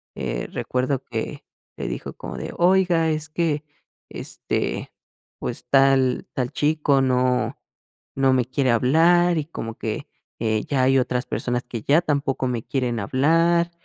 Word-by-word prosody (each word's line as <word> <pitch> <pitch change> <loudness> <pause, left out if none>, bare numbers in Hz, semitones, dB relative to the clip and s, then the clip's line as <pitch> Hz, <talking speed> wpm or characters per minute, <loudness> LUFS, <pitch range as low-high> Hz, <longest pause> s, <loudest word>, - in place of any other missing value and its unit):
Eh, - - -3
recuerdo 130 +1 -1
que - - -5 0.3
le - - -4
dijo - - -5
como 65 - -8
de: - - -6
"Oiga, 175 -2 +3
es 155 0 -2
que, 155 -2 -1 0.5
este, - - -3 0.5
pues - - -5
tal 135 -2 +3
tal 125 -2 -2
chico, 150 -2 +2
no 125 -1 +1 0.6
no 135 -1 +3
me 125 -2 +2
quiere 130 -1 +1
hablar, 165 +8 +4
y 150 - -1
como 115 -8 -7
que, 110 -1 -4 0.3
eh, 110 -2 0
ya 135 -3 +1
hay 135 +1 +4
otras 125 0 -1
personas 125 0 -2
que 120 -3 -6
ya 150 +5 +4
tampoco 140 -4 -1
me 120 -3 -2
quieren 125 -4 -1
hablar" 165 - +2
135 Hz, 145 wpm, -23 LUFS, 125-155 Hz, 0.6 s, hablar